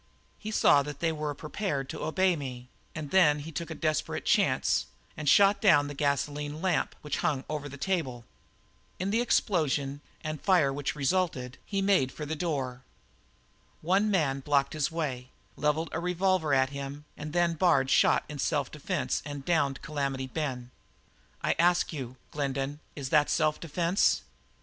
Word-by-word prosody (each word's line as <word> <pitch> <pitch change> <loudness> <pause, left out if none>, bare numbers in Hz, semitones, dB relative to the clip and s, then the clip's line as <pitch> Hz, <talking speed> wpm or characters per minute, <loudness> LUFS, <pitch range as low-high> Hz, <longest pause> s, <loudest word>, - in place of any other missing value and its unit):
He 215 - -6
saw 145 -8 +5
that 145 0 -6
they 165 +1 +1
were 150 -2 -3
prepared 150 -3 -3
to - - -6
obey 185 +2 +2
me, 125 -4 -7 0.3
and 155 -3 -5
then 165 -6 +5
he 150 +2 -7
took 170 +1 -5
a 160 - -5
desperate 155 -1 -1
chance - - +2 0.3
and 150 -2 -1
shot 200 +4 +5
down 155 -8 +5
the 145 - -6
gasoline 145 +1 -1
lamp 180 -2 0
which 150 - -2
hung 135 -3 0
over 150 -1 -4
the 140 - -9
table. 135 -9 -2 0.7
In 190 +2 -2
the 230 +3 +2
explosion 145 - +1 0.2
and 155 -2 -4
fire 170 -8 +3
which 145 +1 -3
resulted 140 -4 -1
he 195 -1 -1
made 190 -10 +3
for 150 - -6
the 155 +2 -3
door. 135 -6 -2 1.0
One 195 +6 +2
man 150 -9 +1
blocked 140 0 +1
the 155 -2 0
way, 130 -6 -3 0.3
levelled 150 +2 0
a 160 - -2
revolver 180 -2 +1
at 130 0 +3
him, 140 +1 -6
and 150 +1 -7
then 175 0 +2
Bard 150 -6 +3
shot - - +4
in 150 -1 -7
self 140 -1 0
defence 150 +2 -2
and 145 -2 -7
downed 145 -6 +1
Calamity 140 -3 -2
Ben. 130 -3 -4 0.7
I - - +2
ask 175 0 +3
you, 130 -4 -6
Glendin, 140 0 -2 0.2
is 140 -3 -5
that 150 -1 +4
self 155 -2 +1
defence?" 170 +3 +1
150 Hz, 165 wpm, -29 LUFS, 140-170 Hz, 1.0 s, saw